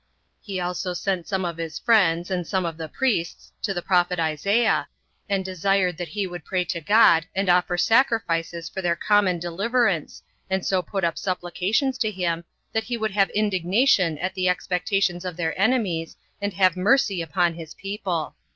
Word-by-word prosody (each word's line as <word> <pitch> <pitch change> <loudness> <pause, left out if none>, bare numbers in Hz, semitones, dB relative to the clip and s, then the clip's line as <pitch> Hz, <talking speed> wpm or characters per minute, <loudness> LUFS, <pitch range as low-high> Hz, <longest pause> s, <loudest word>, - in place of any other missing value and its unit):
He 195 -4 -5
also 180 +1 -3
sent 185 -3 -2
some 190 -2 -1
of 170 -1 -4
his 165 -1 -5
friends, 180 -6 +2
and 180 -3 -2
some 190 -2 0
of 165 -1 -3
the 160 -1 -7
priests, 200 -9 -2
to 205 - -1
the 175 -3 -3
prophet 180 -1 +2
Isaiah, 185 +9 +1 0.4
and 195 -2 0
desired 185 -1 +1
that 175 - -4
he 195 +6 -3
would 175 -2 -7
pray 185 -2 -1
to 170 0 -3
God, 170 -3 +5
and 195 0 0
offer 180 0 +3
sacrifices 175 -8 +1
for 190 - -5
their 175 -2 +1
common 200 0 +2
deliverance, 195 +1 -1 0.3
and 190 -1 -1
so 190 -1 +1
put 190 +2 -4
up 170 -1 0
supplications 195 +8 -1
to 220 - +1
him, 175 -4 -2 0.3
that 220 0 0
he 240 -1 -3
would 220 -2 -2
have 195 0 +2
indignation 190 - +2
at 185 +5 -3
the 185 -1 +1
expectations 180 0 0
of 180 -2 -5
their 165 -2 -1
enemies, 200 -8 +1 0.3
and 200 0 -2
have 185 -1 +3
mercy 200 -1 +2
upon 170 +2 +1
his 165 -1 -10
people. 195 -5 -3
185 Hz, 180 wpm, -24 LUFS, 170-200 Hz, 0.4 s, God